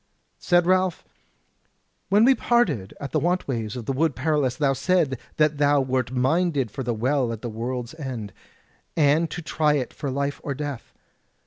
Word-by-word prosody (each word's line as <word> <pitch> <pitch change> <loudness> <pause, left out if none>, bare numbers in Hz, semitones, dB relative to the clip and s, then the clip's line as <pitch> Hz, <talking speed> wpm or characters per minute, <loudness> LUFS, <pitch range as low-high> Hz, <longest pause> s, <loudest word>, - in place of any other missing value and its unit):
Said 175 -1 +3
Ralph: 185 -1 +1 1.0
"When 205 +3 +5
we 270 - +7
parted 190 - +1
at 140 - -6
the 155 - +1
want 175 +4 0
ways 115 -5 -3
of 120 -3 -6
the 135 - -1
Wood 150 0 +1
Perilous 145 -3 0
thou 135 0 +2
saidst 165 0 +1 0.2
that 150 -1 +2
thou 145 0 +4
wert 130 -2 -1
minded 135 - +1
for 135 - -5
the 125 -2 -1
Well 125 +2 +1
at 115 -2 -7
the 120 - -3
World's 120 +3 -4
End, 130 - -6 0.6
and 155 +2 +3
to 175 +3 -6
try 155 -1 +1
it 130 -4 -2
for 140 - -4
life 140 +2 -2
or 140 - -3
death. 145 -3 -6
140 Hz, 180 wpm, -24 LUFS, 125-160 Hz, 1.0 s, we